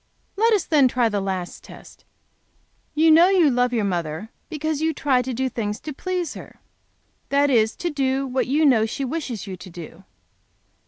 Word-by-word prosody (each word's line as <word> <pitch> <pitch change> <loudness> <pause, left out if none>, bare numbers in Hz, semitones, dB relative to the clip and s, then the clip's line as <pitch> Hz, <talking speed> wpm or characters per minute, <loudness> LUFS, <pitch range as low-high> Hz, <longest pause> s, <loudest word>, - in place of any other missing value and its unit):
"Let 455 +3 +3
us 410 - +2
then 295 -5 +4
try 245 -2 +1
the 205 -2 -1
last 190 -2 -4
test. - - -15 0.9
You 320 +1 +5
know 330 +3 +7
you 360 -7 +4
love 245 0 +1
your 225 -4 0
mother 175 +1 -3 0.2
because 310 -2 -3
you 320 0 0
try 260 -3 +2
to 255 +1 -4
do 260 +2 -1
things 215 -4 -3
to 305 - -6
please 360 +1 -3
her. - - -12 0.7
That 285 0 +2
is 225 -2 +2
to 345 - -3
do 270 -1 0
what 260 0 -1
you 300 +4 +2
know 225 -6 +4
she 270 +4 -4
wishes 255 - -4
you 190 -2 -6
to 185 - -11
do? 170 +1 -11
260 Hz, 190 wpm, -22 LUFS, 215-310 Hz, 0.9 s, know